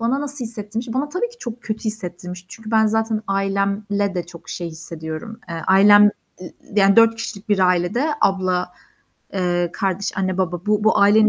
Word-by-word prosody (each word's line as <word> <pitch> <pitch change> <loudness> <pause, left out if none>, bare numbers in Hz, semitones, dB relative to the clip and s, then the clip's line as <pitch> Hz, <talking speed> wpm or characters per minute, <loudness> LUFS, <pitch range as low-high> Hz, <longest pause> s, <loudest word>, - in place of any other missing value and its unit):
Bana 250 +5 +1
nasıl 285 -3 -4
hissettirmiş? 225 +1 -5
Bana 275 +3 -1
tabii 365 +10 -2
ki 480 0 -17
çok 240 0 -7
kötü 220 0 -4
hissettirmiş. 180 -4 -5
Çünkü 220 +1 -10
ben 220 -1 +4
zaten 220 0 0
ailemle 200 0 0
de 175 -1 -3
çok 170 -1 -13
şey 175 -1 -4
hissediyorum. 160 +5 -7
Eee, 170 - -5
ailem, 205 +2 +7 0.3
i 180 - -9 0.2
yani, 200 0 +5
4 230 0 +6
kişilik 215 -2 -7
bir 205 - +2
ailede 185 - +2
abla, 185 -2 +1 0.6
eee, 175 -2 0
kardeş, 195 0 -1
anne, 185 0 -1
baba, 180 +1 -2
bu 210 0 +2
bu 220 - +4
ailenin 215 +2 +6
200 Hz, 175 wpm, -21 LUFS, 180-225 Hz, 0.6 s, ailem